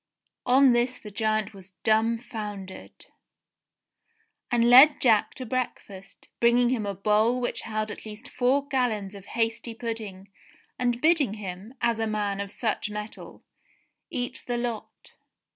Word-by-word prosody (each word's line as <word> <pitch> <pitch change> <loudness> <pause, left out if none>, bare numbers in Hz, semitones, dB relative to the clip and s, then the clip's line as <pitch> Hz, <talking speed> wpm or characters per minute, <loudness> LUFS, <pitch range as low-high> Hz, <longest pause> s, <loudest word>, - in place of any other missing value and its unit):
On 260 +1 +6
this 240 +1 +1
the 210 - -11
giant 215 0 -1
was 190 -1 -12
dumbfoundered, 220 -3 -2 1.4
and 235 -1 +3
led 265 +5 +8
Jack 220 -5 +3
to 255 - -6
breakfast, 215 -6 -5
bringing 240 +1 +4
him 230 -5 -1
a 200 - -3
bowl 215 +5 +2
which 245 - -2
held 215 -1 -3
at - - -9
least 215 +4 -9
four 265 +3 +1
gallons 225 -8 -1
of 200 -1 -12
hasty 230 0 -1
pudding, 220 -5 -6 0.5
and 245 -1 0
bidding 310 - +3
him, 200 +3 -8
as 235 -1 +1
a 225 - 0
man 205 -2 -2
of 200 - -5
such 215 -1 -2
mettle, 210 +1 -8 0.7
eat 245 0 -3
the 245 -1 -1
lot. 240 -2 -6
225 Hz, 140 wpm, -26 LUFS, 210-245 Hz, 1.4 s, led